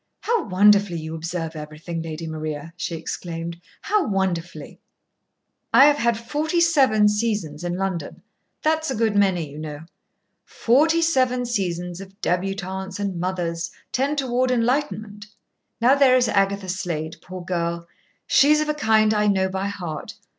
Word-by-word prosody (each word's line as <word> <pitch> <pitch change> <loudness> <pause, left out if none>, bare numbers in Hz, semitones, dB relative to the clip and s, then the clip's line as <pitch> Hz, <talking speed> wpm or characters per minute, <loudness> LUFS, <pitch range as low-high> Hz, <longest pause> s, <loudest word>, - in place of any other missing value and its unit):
"How 465 -1 0
wonderfully 200 -1 +4
you 160 0 -6
observe 165 0 -4
everything, 155 +2 -6
Lady 165 0 -6
Maria!" 155 0 -5
she 175 -1 -4
exclaimed. 170 +1 -6 0.2
"How 420 -1 +2
wonderfully!" 175 -6 -3 0.9
"I 275 - +8
have 295 0 +5
had 235 -4 +1
forty 300 +8 -1
seven 265 -11 +4
seasons 210 -8 -1
in 175 0 -2
London. 185 -6 -4 0.4
That's 315 0 +1
a 265 - -1
good 220 -1 +1
many, 190 -5 +2
you 145 +2 -10
know. 150 -1 -6 0.6
Forty 315 +8 +2
seven 255 -6 +2
seasons 180 -5 -3
of 195 +1 -13
débutantes 190 +1 -2
and 195 -4 -2
mothers 175 -2 -2 0.2
tend 280 +3 0
toward 255 -2 +1
enlightenment. 230 -4 -1 0.5
Now 245 +3 +5
there 275 -2 +5
is 245 -2 +2
Agatha 200 -1 +1
Slade, 170 -4 -3
poor 185 -1 -9
girl! 170 -1 -2 0.4
She's 300 +2 +5
of 305 0 -1
a - - +2
kind 220 -6 +3
I 210 0 +2
know 190 -2 +2
by 190 +1 -2
heart. 175 -6 -6
195 Hz, 145 wpm, -23 LUFS, 170-245 Hz, 0.9 s, I